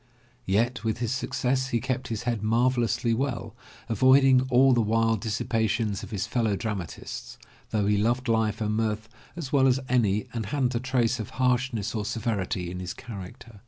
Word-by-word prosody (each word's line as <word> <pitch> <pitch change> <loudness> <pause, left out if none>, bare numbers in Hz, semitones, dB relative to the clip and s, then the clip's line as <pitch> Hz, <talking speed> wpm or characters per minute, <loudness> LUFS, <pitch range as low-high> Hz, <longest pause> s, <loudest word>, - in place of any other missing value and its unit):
Yet 115 +5 +1
with 110 -1 -1
all - - -12
his 120 0 0
success 130 0 -1
he 120 -2 0
kept 130 +1 -2
his 110 -2 -4
head 120 -4 -1
marvelously 120 +1 +1
well, 120 -2 -2 0.3
avoiding 130 +3 +5
all 130 +1 +5
the 120 - +3
wild 115 0 +1
dissipations 110 -1 -1
of - - -8
his 100 -5 -2
fellow 115 -4 0
dramatists, 100 -5 -5 0.3
though 105 -2 0
he 105 0 +2
loved 120 +5 +1
life 110 0 +1
and 105 0 0
mirth 110 0 -1 0.3
as 150 -6 -6
well 135 -2 +5
as 130 0 +3
any 110 -4 +2
and 110 -4 -3
hadn't 130 -1 0
a 115 - 0
trace 125 -1 0
of 110 - -5
harshness 125 -4 +1
or 110 -2 -2
severity 100 -6 -2
in 90 - -5
his 90 -1 -5
character. 110 0 -10
115 Hz, 180 wpm, -27 LUFS, 105-125 Hz, 0.3 s, avoiding